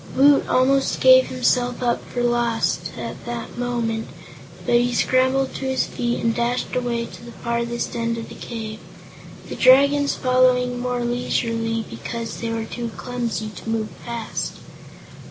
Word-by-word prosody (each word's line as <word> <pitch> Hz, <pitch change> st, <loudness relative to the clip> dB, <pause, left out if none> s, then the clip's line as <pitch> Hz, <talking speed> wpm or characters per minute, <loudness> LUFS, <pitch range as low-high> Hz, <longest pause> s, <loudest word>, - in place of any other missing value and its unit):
Woot 280 Hz, +2 st, +5 dB
almost 270 Hz, +1 st, +2 dB
gave 260 Hz, 0 st, +7 dB
himself 250 Hz, -1 st, 0 dB
up 240 Hz, -1 st, +1 dB
for 245 Hz, -, -2 dB
lost, 240 Hz, -1 st, 0 dB
at -, -, -6 dB
that 235 Hz, -1 st, -5 dB
moment, 235 Hz, -2 st, -2 dB, 0.6 s
but -, -, +1 dB
he 240 Hz, +1 st, +3 dB
scrambled 260 Hz, +1 st, +2 dB
to 270 Hz, -, -5 dB
his 265 Hz, 0 st, +1 dB
feet 240 Hz, 0 st, -2 dB
and 230 Hz, 0 st, +1 dB
dashed 240 Hz, +2 st, -1 dB
away 240 Hz, -2 st, -1 dB
to -, -, -12 dB
the 235 Hz, -, -10 dB
farthest 235 Hz, +1 st, -3 dB
end 230 Hz, 0 st, -1 dB
of 225 Hz, -, -6 dB
the -, -, -9 dB
cave, 220 Hz, -2 st, -6 dB, 0.7 s
the -, -, -6 dB
Dragons 280 Hz, +2 st, +5 dB
following 255 Hz, -1 st, +2 dB
more 245 Hz, -1 st, -1 dB
leisurely 230 Hz, -2 st, -1 dB
because 230 Hz, -1 st, -6 dB
they 230 Hz, -, -2 dB
were 225 Hz, -1 st, -2 dB
too 235 Hz, +1 st, -5 dB
clumsy 240 Hz, -3 st, -3 dB
to 210 Hz, +2 st, -9 dB
move 225 Hz, -1 st, -1 dB
fast. 235 Hz, -2 st, -4 dB
240 Hz, 155 wpm, -22 LUFS, 230-255 Hz, 0.7 s, gave